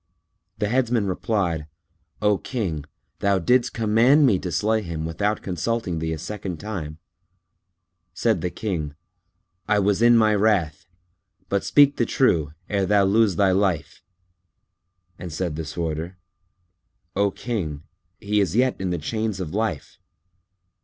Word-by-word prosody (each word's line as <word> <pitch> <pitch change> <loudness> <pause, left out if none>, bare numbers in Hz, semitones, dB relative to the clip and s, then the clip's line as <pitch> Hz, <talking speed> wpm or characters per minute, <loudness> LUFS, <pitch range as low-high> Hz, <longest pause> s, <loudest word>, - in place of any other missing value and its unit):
The 105 - 0
Headsman 120 -3 +1
replied, 90 -5 -1 0.6
"O 105 -1 +3
King, 90 - -3 0.3
thou 100 -1 +2
didst 120 +8 +2
command 115 +7 +4
me 105 -8 +3
to 90 -1 -5
slay 110 +7 +1
him 85 -4 -5
without 100 +6 -1
consulting 95 0 -2
thee 80 0 -2
a 80 - -2
second 95 +1 -5
time." 85 -7 -5 1.1
Said 110 +7 0
the 90 - -1
King, 85 -7 -4 0.7
"I 105 - +3
was 100 +1 +2
in 120 0 +6
my 110 -1 +4
wrath; 100 -8 +1 0.6
but 100 0 0
speak 145 -1 +5
the 120 - +1
truth, 80 - +2 0.2
ere 100 -2 0
thou 100 0 +4
lose 100 0 +3
thy 95 0 +3
life;" 95 -3 0 1.2
and 90 -1 -7
said 80 0 -3
the 80 - -4
Sworder, 80 +2 -4 1.0
"O 100 +1 +3
King, 90 -11 -4 0.4
he 105 +1 0
is 95 -2 0
yet 125 -3 +2
in 95 - -1
the 90 - -1
chains 110 +5 -3
of 90 -3 -5
life." 105 -8 -3
100 Hz, 140 wpm, -23 LUFS, 85-110 Hz, 1.2 s, in